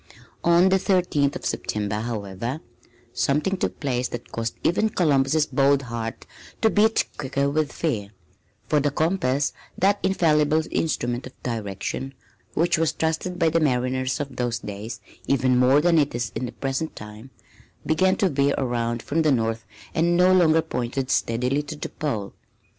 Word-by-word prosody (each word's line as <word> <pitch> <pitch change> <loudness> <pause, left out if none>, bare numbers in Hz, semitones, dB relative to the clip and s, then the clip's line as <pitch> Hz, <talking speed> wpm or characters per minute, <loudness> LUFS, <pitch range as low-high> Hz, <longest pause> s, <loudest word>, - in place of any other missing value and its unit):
On 170 +2 +5
the 190 0 +3
Thirteenth 175 -8 +1
of - - -6
September, 105 0 -2
however, 115 +3 -4 0.5
something 150 +9 +1
took 185 - -3
place 125 -3 -1
that 120 - -8
caused 115 -1 -3
even 215 +6 +2
Columbus' 150 -4 +2
bold 140 -1 +2
heart 115 -2 -5 0.4
to 220 - +5
beat 220 +2 +3
quicker 140 0 0
with 150 0 0
fear, 110 -12 -2 0.6
for 150 - +3
the 145 +1 +1
compass, 145 -3 0 0.2
that 200 +2 +3
infallible 155 -4 +2
instrument 120 -5 -1
of 130 - -14
direction, 115 +4 -4 0.4
which 165 0 +2
was 165 -1 +1
trusted 160 +3 -2
by 165 -2 +3
the 165 - +2
mariners 130 -2 0
of 140 -3 -5
those 120 -2 -1
days 110 +1 -7 0.3
even 130 -2 +2
more 125 +3 +5
than 170 0 +4
it 145 -4 0
is 120 -1 -2
in 125 - -3
the - - -7
present 135 +5 -3
time, 105 +4 -10 0.6
began 185 +4 +3
to 195 - +2
veer 140 -1 +1
around 120 -3 -1
from 165 +3 0
the 155 -2 +3
north 115 -3 0 0.3
and 170 +2 +2
no 180 +1 +5
longer 165 -3 +4
pointed 130 -2 -3
steadily 125 +5 +1
to 150 +1 -7
the 150 - -6
pole. 110 -10 -3
140 Hz, 160 wpm, -24 LUFS, 120-160 Hz, 0.6 s, On